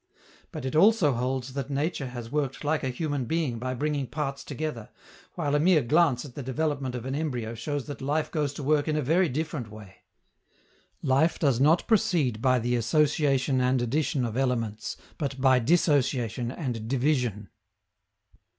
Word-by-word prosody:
But - - -6
it 130 - -3
also 190 -2 +5
holds 130 +1 -2
that 140 -1 -4
nature 140 0 -1
has 120 -2 -7
worked 145 -2 -2
like 150 +1 0
a 130 - 0
human 145 0 -2
being 145 -4 -1
by 130 +1 -3
bringing 145 0 -1
parts 140 +1 -4
together, 145 -6 -5 0.5
while 145 -4 -1
a 145 - +3
mere 160 -2 +4
glance 150 0 +2
at 135 - -11
the 145 - -6
development 135 -1 -2
of 125 -1 -5
an 130 - -3
embryo 125 -7 -2
shows 140 +4 -4
that 145 -2 -7
life 150 +3 -1
goes 150 -3 0
to 145 - -6
work 145 +1 +2
in 155 - 0
a 155 - +1
very 165 +6 +3
different 145 -4 -3
way. 105 -2 -12 1.1
_Life 140 +6 +2
does 135 -6 +2
not 155 +6 +4
proceed 160 - +1
by 130 0 +3
the 120 +1 0
association 135 +1 +2
and 125 +1 +2
addition 130 +1 0
of 115 -1 -4
elements, 115 -5 -1 0.2
but 140 -3 -3
by 130 -1 +5
dissociation 125 - +1
and 125 -7 -4
division. 125 -6 0
135 Hz, 170 wpm, -27 LUFS, 125-150 Hz, 1.1 s, also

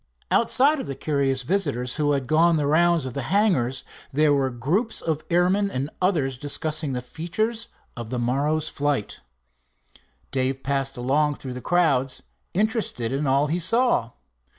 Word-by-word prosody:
Outside 275 +6 +4
of - - -5
the 135 - -4
curious 135 -3 0
visitors 140 -7 -1
who 145 -1 +2
had 135 -2 -1
gone 165 +4 +4
the 150 - 0
rounds 170 +1 +3
of 130 - -5
the 140 - -3
hangars, 135 - +1 0.3
there 150 +1 +3
were 135 -2 +1
groups 160 - -1
of 155 -2 -2
airmen 185 +4 +2
and 140 -2 -3
others 145 -9 0
discussing 150 0 -1
the 125 -1 -3
features 215 - -2 0.3
of 120 -3 -7
the 125 - -3
morrow's 145 +6 0
flights. 145 -7 -2 1.1
Dave 135 0 -1
passed 135 -1 -1
along 145 +4 +1
through 130 -2 -7
the 125 - -7
crowds, 135 -7 +1 0.3
interested 210 - 0
in 140 +2 -1
all 135 +2 +3
he 160 +4 -1
saw. 185 - +1
145 Hz, 155 wpm, -24 LUFS, 130-175 Hz, 1.1 s, Outside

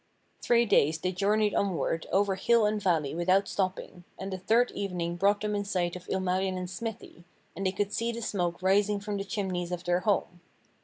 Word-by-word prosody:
Three 235 0 +3
days 160 -6 +3
they 180 +3 -2
journeyed 205 +3 +1
onward 175 -4 -1
over 195 0 +2
hill 225 +4 +3
and 210 0 0
valley 165 -7 +1
without 185 +4 +2
stopping, 185 -2 -3
and 190 0 -5
the - - -3
third 230 +6 +2
evening 175 -4 -3
brought 200 +3 +2
them 210 0 -1
in 205 0 -1
sight 180 -3 -1
of 180 0 -10
Ilmarinen's 185 -1 -1
smithy, 225 -4 -7 0.3
and 195 0 -1
they - - +1
could 205 +1 -2
see 230 +2 0
the 235 0 -6
smoke 175 -4 -2
rising 200 +2 +3
from 205 0 -4
the 195 - -3
chimneys 190 -3 -3
of 175 0 -4
their 175 0 +1
home. 180 -3 -1
190 Hz, 195 wpm, -29 LUFS, 180-205 Hz, 0.3 s, Three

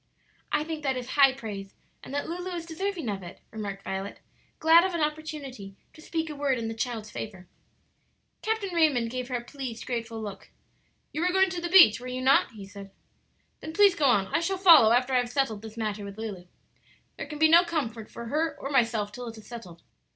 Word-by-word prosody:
"I 300 - +1
think 315 -1 -5
that 270 -3 -1
is 250 0 -6
high 275 -1 +6
praise, 205 -6 -8 0.3
and - - -10
that 285 +1 -2
Lulu 355 +2 -4
is 335 -1 -5
deserving 345 -2 -3
of 200 -2 -3
it," 175 -1 -10
remarked 200 -3 -6
Violet, 195 +1 -5 0.4
glad 325 +2 +6
of 375 -2 -1
an 335 - -1
opportunity 295 -10 -5 0.2
to 310 - -15
speak 325 0 -3
a 300 - -6
word 280 -2 0
in 230 -1 -3
the 225 - -3
child's 225 -2 -4
favor. 190 -4 -7 0.9
Captain 435 -4 -2
Raymond 285 -9 +2
gave 255 0 -4
her 255 - -3
a 240 - -3
pleased, 250 -3 -7
grateful 230 -2 -4
look. 205 -3 -8 0.6
"You 310 - -2
were 360 +1 +2
going 380 0 +3
to 355 -1 -4
the 345 - -3
beach, 340 - +8
were 250 - -8
you 255 0 -4
not?" 270 +1 +4
he 205 -3 -9
said. 200 0 -11 0.7
"Then 315 - -7
please 405 +1 +6
go 310 -6 0
on; 225 -7 +4
I - - +3
shall 380 +3 -1
follow 330 - +8
after 250 +2 +2
I - - +5
have 245 -1 0
settled 245 -6 -1
this 220 0 -10
matter 215 -2 -3
with 200 0 -8
Lulu. 205 -5 -6 0.7
There - - -6
can 300 - -7
be 315 +1 +5
no 335 +2 +7
comfort 240 -11 -3
for 235 - -8
her 310 +7 -1
or 275 - -5
myself 230 -6 +1
till 245 +3 -7
it 225 -1 -8
is 220 - -13
settled. 185 -9 -10
255 Hz, 220 wpm, -27 LUFS, 220-315 Hz, 0.9 s, beach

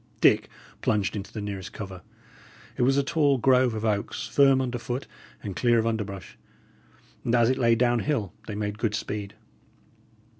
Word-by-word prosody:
Dick - - +4 0.3
plunged 100 -2 0
into 100 -1 -6
the 110 - -5
nearest 100 -2 -6
cover. 95 -3 -7 0.7
It - - -3
was 135 +3 +3
a 140 - +3
tall 145 -2 +2
grove 125 -1 +3
of 110 +1 -3
oaks, 105 -2 -1
firm 135 -2 +5
under 125 -2 -2
foot 125 +3 -4 0.4
and 100 -3 -5
clear 120 +2 +3
of 115 - +2
underbrush, 105 -5 -4 0.8
and 120 - +1
as 120 0 +4
it 130 - -1
lay 115 -2 +4
down 120 0 +2
hill, 115 - -1
they 105 - -4
made 105 0 -3
good 110 -3 0
speed. 105 -2 -4
115 Hz, 175 wpm, -26 LUFS, 105-125 Hz, 0.8 s, firm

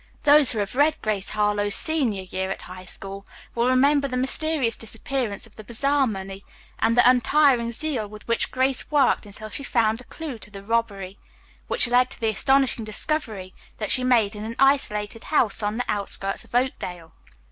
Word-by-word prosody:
Those 290 -2 +6
who - - -2
have 200 -2 -2
read 295 +4 +2
"Grace 210 -3 -1
Harlowe's 210 0 0
Senior 255 -12 0
Year 190 +1 -4
at 195 - -5
High 185 +1 -10
School" 195 +2 -8 0.3
will 235 +1 +1
remember 280 +2 +3
the 255 -2 -3
mysterious 265 -1 +2
disappearance 225 -1 -4
of 225 - -19
the 215 - -9
bazaar 275 +5 +1
money 195 -2 -6 0.4
and 230 +1 +2
the 245 - +7
untiring 250 -1 +3
zeal 250 -4 -2
with 210 +1 -13
which 230 - 0
Grace 260 0 0
worked 285 -7 +2
until 215 +2 -10
she 275 - -6
found 225 -3 +1
a - - -15
clew 295 -6 -7
to 210 - -9
the 200 -2 -10
robbery, 200 -3 -2 0.5
which - - +3
led 250 +1 +3
to - - -11
the 225 - +1
astonishing 265 +2 +2
discovery 215 -4 -3 0.2
that 215 - -3
she 255 - +3
made 230 -5 +2
in 210 - -6
an 225 +1 -5
isolated 225 -6 +1
house 245 -10 +1
on 210 +1 -2
the 250 - -1
outskirts 195 -1 -2
of - - -11
Oakdale. 180 - -2
230 Hz, 185 wpm, -24 LUFS, 205-265 Hz, 0.5 s, the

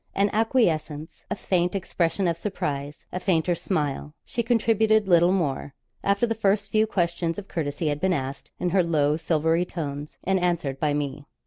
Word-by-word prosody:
An 200 +1 +2
acquiescence, 165 - 0
a - - -1
faint 180 -2 0
expression 180 0 0
of 170 - +1
surprise, 145 -6 -4
a 180 - -3
fainter 175 -2 +1
smile 150 -4 -2
she 235 - -2
contributed 220 -2 +3
little 175 -1 +5
more, 145 -6 -1 0.3
after 200 +3 +2
the 225 - 0
first 205 -1 +1
few 215 0 +3
questions 170 -3 -1
of 200 -1 -7
courtesy 155 -1 -2
had 145 0 -2
been 190 0 +2
asked, 135 -4 -3
in 180 - 0
her 190 +1 +4
low 150 -4 +2
silvery 160 +1 +1
tones, 150 -4 -5
and 190 0 +2
answered 170 -7 -1
by 150 -2 +1
me. 145 -1 -3
170 Hz, 175 wpm, -25 LUFS, 150-195 Hz, 0.3 s, little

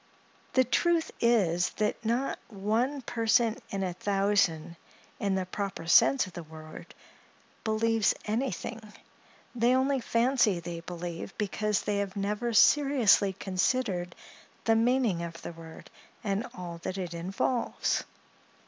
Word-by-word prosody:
The 260 - +5
truth 330 +6 +1
is, 180 -7 +3
that 215 +2 -1
not 240 +4 -1
one 230 +7 -1
person 230 -1 +2
in 195 -1 -2
a 180 -2 -2
thousand, 195 -4 +1 0.4
in 200 -2 0
the 190 -1 -1
proper 190 -2 -4
sense 255 +9 +5
of 185 - -12
the 175 - -6
word, 155 -1 -11 0.7
believes 225 -1 +2
anything; 230 +1 -2 0.7
they 245 +1 +3
only 270 +1 +2
fancy 235 -5 +2
they 170 0 -6
believe, 175 +1 -7
because 210 0 0
they 205 -1 -1
have 200 -2 -2
never 210 +4 -1
seriously 235 -5 +5
considered 185 -1 -1 0.5
the 225 - +3
meaning 230 -5 +2
of 165 -1 -6
the - - -6
word 165 -1 -12 0.3
and 205 +3 -1
all 170 -2 -7
that 185 - -4
it 180 -3 -4
involves. 195 +8 -1
205 Hz, 130 wpm, -29 LUFS, 180-235 Hz, 0.7 s, The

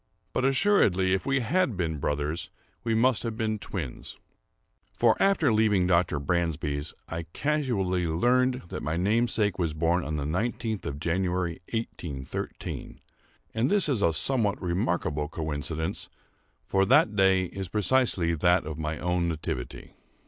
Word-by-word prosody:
But 130 - +1
assuredly 130 - +3
if 95 - -1
we 135 -1 +2
had 140 - +1
been 80 -4 -2
brothers 75 +3 -2 0.3
we 115 -1 0
must 120 0 +3
have 115 -2 -4
been 110 -2 -1
twins; 85 -10 -6 0.7
for, 115 -2 +3
after 180 - +3
leaving 105 -4 +3
Dr. 85 -4 +2
Bransby's, 75 -1 -1
I 80 0 -5
casually 115 - 0
learned 125 +9 +2
that - - -5
my 80 +2 -2
namesake 105 +1 +1
was 80 -3 -1
born 85 +3 +1
on 75 - -3
the 70 -2 -2
nineteenth 110 +5 -2
of 70 0 -5
January, 90 0 -1
1813—and 110 - -5
this 200 -3 +4
is 130 -8 +1
a 85 - +4
somewhat 105 - +2
remarkable 85 -5 -1
coincidence; 80 +3 -4 0.6
for 95 - +2
the 95 - +6
day 95 -3 +2
is 95 +1 -6
precisely 105 -3 +2
that 90 +1 +2
of 80 0 -6
my 75 0 -2
own 90 +1 0
nativity. 75 -6 -5
90 Hz, 140 wpm, -27 LUFS, 80-115 Hz, 0.7 s, the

